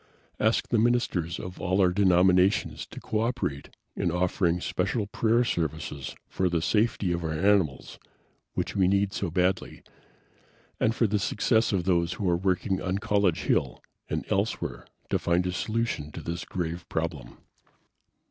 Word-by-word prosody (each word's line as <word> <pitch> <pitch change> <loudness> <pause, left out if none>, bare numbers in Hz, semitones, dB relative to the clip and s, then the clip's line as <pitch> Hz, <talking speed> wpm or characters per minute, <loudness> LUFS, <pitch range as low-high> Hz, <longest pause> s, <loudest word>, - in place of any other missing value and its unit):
Ask 110 +2 +1
the 120 - +2
ministers 110 -8 +1
of 90 -1 -8
all 95 +2 +1
our 90 -2 +5
denominations 90 0 +3
to - - -9
co 110 - -2
operate 115 - -2 0.3
in - - 0
offering 90 0 +1
special 100 +5 -1
prayer 115 +4 +2
services 80 - -3
for 95 -1 0
the 85 -1 +1
safety 105 +1 +1
of 85 0 -2
our 80 -1 -2
animals, 95 -5 +1 0.6
which - - -2
we 95 -2 +3
need 100 +1 +2
so 95 - -2
badly, 90 +2 -1 1.0
and 115 - +2
for 115 - +2
the 105 0 +1
success 110 +3 +2
of 95 -4 0
those 85 -1 +1
who 95 +1 -3
are 85 - +3
working 95 +1 0
on 90 +1 -1
College 100 -5 +1
Hill - - 0 0.3
and - - -2
elsewhere - - -1 0.2
to - - +2
find 85 +1 +1
a 90 - 0
solution 110 -6 -2
to - - -6
this 85 +1 -4
grave 85 -1 -4
problem." 80 -7 -4
90 Hz, 155 wpm, -27 LUFS, 85-105 Hz, 1.0 s, our